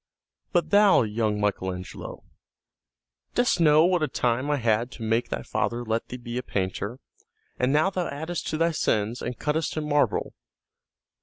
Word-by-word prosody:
"But 175 -2 +1
thou, 205 - +6
young 105 -1 -1
Michael 100 -2 0
Angelo, 90 0 -8 1.1
dost 245 -6 +2
know 155 -1 +6
what 180 -1 +2
a 155 - +2
time 125 +1 0
I 145 - +2
had 115 -1 +1
to 115 - -8
make 115 +2 0
thy - - -3
father 120 +1 -2
let 115 +1 -1
thee 125 - -6
be 120 0 -5
a - - -3
painter, 100 +1 -3 0.6
and 125 +1 +2
now 155 +6 +3
thou 180 -2 -2
addest 160 +4 -4
to 155 - -1
thy 165 +1 +2
sins 110 -6 0
and 125 -1 -4
cuttest 155 +1 -1
in 150 -1 -2
marble. 145 -1 +1
125 Hz, 170 wpm, -26 LUFS, 110-155 Hz, 1.1 s, thou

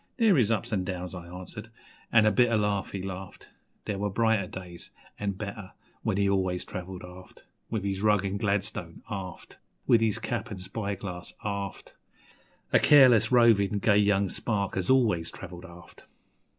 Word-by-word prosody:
'There 225 -6 +5
is 120 -7 +3
ups 115 +1 -1
an' 95 -3 +1
downs,' 90 -1 -5
I 85 -2 -8
answered, 95 +5 -9 0.4
an' 110 -2 +6
a 110 - +5
bitter 120 -2 +3
laugh 105 -2 0
he 95 -2 -5
laughed 95 0 -8 0.3
There 100 -2 -3
were 105 0 -1
brighter 110 -1 +1
days 90 -2 -9 0.3
an' 100 -1 -1
better 100 0 -7 0.3
when - - -1
he 100 0 +2
always 95 -2 0
travelled 90 0 -7
aft 90 +1 -13 0.2
With 110 -4 -2
his 100 -1 -2
rug 105 -2 +3
an' 100 +1 -2
gladstone, 100 -4 -2
aft, 95 -3 -7 0.3
With 115 -2 +5
his 110 -2 +1
cap 110 +5 -3
an' 105 - -6
spyglass, 95 -2 -5
aft 100 -1 -5 0.8
A - - +7
careless, 130 -7 +6
rovin', 110 -5 +4
gay 100 +1 +3
young 100 -1 +3
spark 100 0 -2
as 95 -2 -1
always 110 -11 +3
travelled 90 -1 -9
aft. 85 0 -15
100 Hz, 165 wpm, -28 LUFS, 95-110 Hz, 0.8 s, A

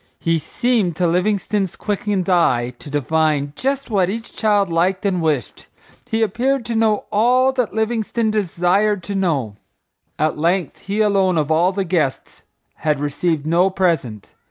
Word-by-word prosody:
He 165 0 +1
seemed 215 - 0
to 180 - 0
Livingstone's 190 +2 0
quickened 205 -2 -2
eye 125 -10 +2
to - - -11
divine 145 0 0
just 275 -1 -2
what 190 -4 +2
each 225 +3 -6
child 205 -3 +2
liked 185 +4 0
and 185 -3 +1
wished. 150 - -2 0.4
He 225 0 +1
appeared 245 +3 0
to 235 - -3
know 220 -2 +1
all 250 +5 +3
that 250 -5 -2
Livingstone 220 0 0
desired 200 0 +1
to 200 - -5
know. 145 - -1 0.6
At 155 0 0
length, 170 0 0
he 205 +2 0
alone 195 -4 +2
of 155 0 0
all 170 +4 +3
the 195 0 -2
guests 165 -7 -2 0.4
had 150 -2 0
received 145 +1 -1
no 170 +4 +3
present. 165 - -1
185 Hz, 155 wpm, -20 LUFS, 160-215 Hz, 0.6 s, all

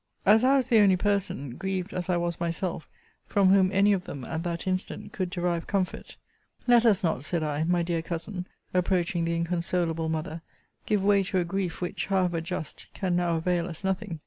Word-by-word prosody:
As 215 +4 +6
I 265 +2 +5
was 260 -2 +1
the 230 -3 +6
only 195 -3 +6
person 180 - -1
(grieved 190 0 -3
as 180 0 -3
I 180 - +2
was 170 0 -2
myself) 170 0 -3 0.4
from 195 -2 +3
whom 190 -1 +5
any 200 +1 +4
of 185 -2 -2
them, 135 -3 -7
at 160 0 -3
that 170 -1 -3
instant, 185 0 -3
could 185 -3 -2
derive 175 -2 -2
comfort; 190 -3 -2 0.5
Let 240 -1 +5
us 200 -4 +3
not, 160 -6 0
said 165 +1 -1
I, 150 +1 -1
my 175 0 +2
dear 170 -1 -1
Cousin, 180 +3 -5 0.3
approaching 180 -1 +1
the 170 0 0
inconsolable 170 -1 -1
mother, 160 +1 -3 0.5
give 210 -3 +1
way 200 0 +4
to 190 0 -2
a 180 - +3
grief, 185 -1 -3
which, 180 - -3
however 180 -4 +1
just, 170 -2 -6
can 185 -3 0
now 175 -1 +1
avail 170 +1 0
us 170 +1 -8
nothing. 185 -4 -2
180 Hz, 200 wpm, -27 LUFS, 170-195 Hz, 0.5 s, As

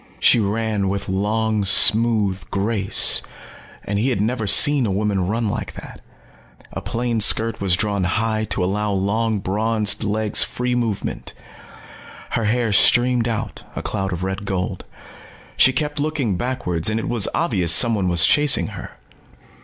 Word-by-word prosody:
She - - +4
ran 105 -1 -2
with 100 0 -4
long 105 +2 -1
smooth 105 0 +3
grace, 100 0 +3 0.6
and 100 0 -3
he 125 +5 0
had 120 - -2
never 110 +1 -2
seen 140 +3 +4
a - - -2
woman 100 -2 -1
run 115 +3 -2
like - - -5
that. - - -12 0.7
A - - -5
plain 120 -1 -3
skirt 110 +1 +1
was 95 -3 +2
drawn 100 -1 -2
high 110 +3 -1
to 95 - -3
allow 105 +3 -2
long 110 +3 -1
bronzed 105 +2 -1
legs 105 0 +1
free 125 0 -3
movement. 115 -5 -4 1.0
Her 115 - -1
hair 115 0 0
streamed 120 +3 +3
out, 115 -2 -4
a - - -5
cloud 95 0 -3
of 90 0 -5
red 95 +1 -4
gold. 95 -1 -4 0.7
She 130 - +4
kept 150 +2 -3
looking 145 -9 -2
backwards 90 -7 -2
and 110 +1 -1
it - - -5
was 115 -5 +1
obvious 95 - 0
someone 105 0 +3
was 85 0 +5
chasing 150 -1 +2
her. - - -10
110 Hz, 155 wpm, -20 LUFS, 100-115 Hz, 1.0 s, was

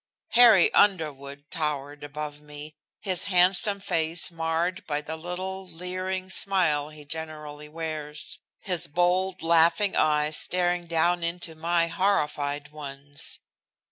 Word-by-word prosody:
Harry 230 -6 +6
Underwood 145 -8 +1
towered 145 -3 -3
above 150 0 -6
me, 150 +1 -10 0.3
his 185 -4 0
handsome 195 +2 +4
face 165 -2 0
marred 165 +2 -1
by 145 -1 -1
the 150 +2 -6
little, 185 +3 -5
leering 185 +1 -5
smile 175 -7 +1
he 155 -1 -13
generally 150 -1 -7
wears, 155 -2 -5 0.2
his 175 -3 +1
bold, 180 +3 0
laughing 170 +4 +3
eyes 150 0 +2
staring 175 0 +1
down 170 +1 +1
into 170 0 -3
my 170 +1 +1
horrified 150 -6 -1
ones. 145 -1 -4
165 Hz, 115 wpm, -26 LUFS, 150-180 Hz, 0.3 s, Harry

